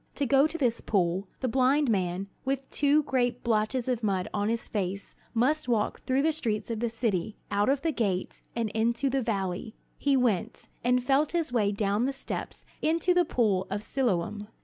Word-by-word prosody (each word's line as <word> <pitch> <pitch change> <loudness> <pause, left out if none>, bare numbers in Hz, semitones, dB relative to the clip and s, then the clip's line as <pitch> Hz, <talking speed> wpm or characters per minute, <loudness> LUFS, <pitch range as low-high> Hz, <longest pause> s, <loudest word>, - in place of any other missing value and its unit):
To 285 - 0
go 275 +3 +5
to 320 +2 -5
this 245 -6 +1
pool, 190 -1 0
the 260 - 0
blind 265 +4 +3
man, 190 -3 0 0.2
with 270 0 -2
two 295 +1 +3
great 245 -3 0
blotches 230 +2 +1
of 245 -3 0
mud 195 -4 0
on 205 +1 0
his 230 0 -2
face, 195 -1 -3 0.2
must 265 +6 +2
walk 220 -3 0
through 265 +2 +2
the 320 - +3
streets 230 -8 -2
of 225 - -2
the 235 0 0
city, 220 -4 -2
out 205 +4 +2
of 275 0 +1
the 325 - +2
gate, 200 -9 -2
and 230 -2 0
into 235 +5 +1
the 270 0 +1
valley. 200 -2 -2 0.2
He 280 -1 +3
went, 235 -8 0
and 250 +1 +2
felt 280 +5 +2
his 330 -7 0
way 210 -4 +2
down 205 +2 0
the 275 - 0
steps 270 - -6 0.2
into 330 +3 +2
the 355 -1 +3
pool 205 -9 +1
of 205 +2 -3
Siloam. 210 -5 -1
235 Hz, 195 wpm, -28 LUFS, 205-270 Hz, 0.2 s, go